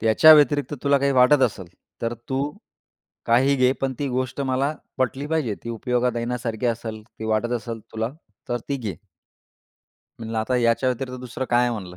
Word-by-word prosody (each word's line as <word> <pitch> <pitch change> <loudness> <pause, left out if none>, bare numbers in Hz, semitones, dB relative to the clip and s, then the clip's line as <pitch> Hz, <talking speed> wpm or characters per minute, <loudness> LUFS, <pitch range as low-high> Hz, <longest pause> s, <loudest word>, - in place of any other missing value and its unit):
त्याच्या 115 +8 +7
व्यतिरिक्त 145 0 +3
तुला 140 -1 +3
काही 140 0 +1
वाटत 130 +2 +5
असेल 105 -7 0 0.4
तर 115 0 -1
तू 135 0 0 0.8
काहीही 130 +4 +4
घे. 130 0 +4
पण 135 -1 0
ती 145 - -1
गोष्ट 130 +1 -2
मला 135 +2 0 0.2
पटली 130 +2 -1
पाहिजे. 150 -8 0
ती 115 - -4
उपयोगात 125 +1 0
येण्यासारखी 120 -1 -2
असेल, 115 -2 -3
ती 110 -1 -11
वाटत 110 +2 0
असेल 115 -1 -6
तुला, 110 +1 -2 0.4
तर 120 - -1
ती 140 - 0
घे. 110 - -5 1.2
म्हणलं 115 0 -4
"आता 110 +3 0
याच्या 120 +1 +2
व्यतिरिक्त 125 0 -3
दुसरं 125 +1 -5
काय 120 0 +4
आहे?" 125 - +2
म्हणलं 90 -5 -7
125 Hz, 175 wpm, -23 LUFS, 115-135 Hz, 1.2 s, त्याच्या